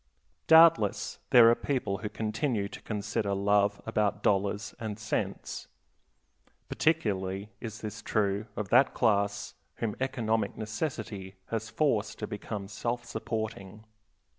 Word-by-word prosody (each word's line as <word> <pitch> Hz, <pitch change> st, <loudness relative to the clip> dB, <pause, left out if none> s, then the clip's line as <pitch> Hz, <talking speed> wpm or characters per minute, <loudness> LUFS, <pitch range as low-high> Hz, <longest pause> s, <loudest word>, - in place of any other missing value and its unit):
Doubtless 160 Hz, -10 st, +5 dB
there 120 Hz, -2 st, +8 dB
are -, -, +6 dB
people 120 Hz, -7 st, -2 dB
who 105 Hz, +1 st, -4 dB
continue 110 Hz, 0 st, -1 dB
to -, -, -10 dB
consider 105 Hz, -1 st, -2 dB
love 100 Hz, +1 st, +2 dB
above 105 Hz, -1 st, 0 dB
dollars 100 Hz, +1 st, +1 dB
and 110 Hz, -3 st, -4 dB
cents. 110 Hz, 0 st, -3 dB, 1.0 s
Particularly 100 Hz, -, 0 dB
is 110 Hz, -2 st, -7 dB
this 110 Hz, 0 st, -6 dB
true 105 Hz, 0 st, 0 dB
of 105 Hz, -2 st, -4 dB
that 130 Hz, +3 st, +5 dB
class 100 Hz, -1 st, +1 dB, 0.2 s
whom 110 Hz, -3 st, -2 dB
economic 115 Hz, -5 st, -1 dB
necessity 110 Hz, -4 st, -4 dB, 0.2 s
has 115 Hz, 0 st, -2 dB
forced 115 Hz, -7 st, 0 dB
to 105 Hz, -, -3 dB
become 105 Hz, -1 st, -5 dB
self 120 Hz, +3 st, -3 dB
supporting. 110 Hz, -2 st, -5 dB
105 Hz, 120 wpm, -29 LUFS, 100-115 Hz, 1.0 s, there